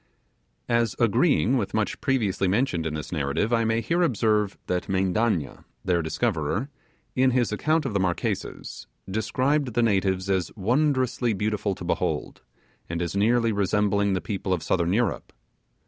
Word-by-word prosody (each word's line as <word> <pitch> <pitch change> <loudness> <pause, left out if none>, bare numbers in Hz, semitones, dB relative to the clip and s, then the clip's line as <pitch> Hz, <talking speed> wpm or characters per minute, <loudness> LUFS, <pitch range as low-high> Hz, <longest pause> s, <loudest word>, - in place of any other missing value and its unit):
As 115 -2 +1
agreeing 115 - +3
with 105 -4 -2
much 110 -1 -1
previously 110 -8 +1
mentioned 90 -5 0
in 75 - -3
this 75 - -6
narrative 80 +8 -1
I 115 -1 +3
may 115 +1 +1
here 170 +11 0
observe 110 - +1
that 90 +1 -2
Mendanna, 95 -3 0 0.2
their 90 -2 +2
discoverer, 95 - -1 0.5
in 130 0 +4
his 125 -3 +1
account 155 +8 +1
of 125 - -2
the 100 - +1
Marquesas, 90 -2 -3 0.2
described 125 +6 0
the 120 - +3
natives 95 -3 +1
as 95 -2 0
wondrously 125 +1 +1
beautiful 105 0 -1
to - - -9
behold, - - -2 0.5
and 85 0 -3
as 85 +2 -3
nearly 115 +3 +3
resembling 100 0 +1
the 95 - -1
people 95 -2 -2
of 85 - -2
southern 85 -2 +1
Europe. 115 +2 0
105 Hz, 150 wpm, -25 LUFS, 95-120 Hz, 0.5 s, in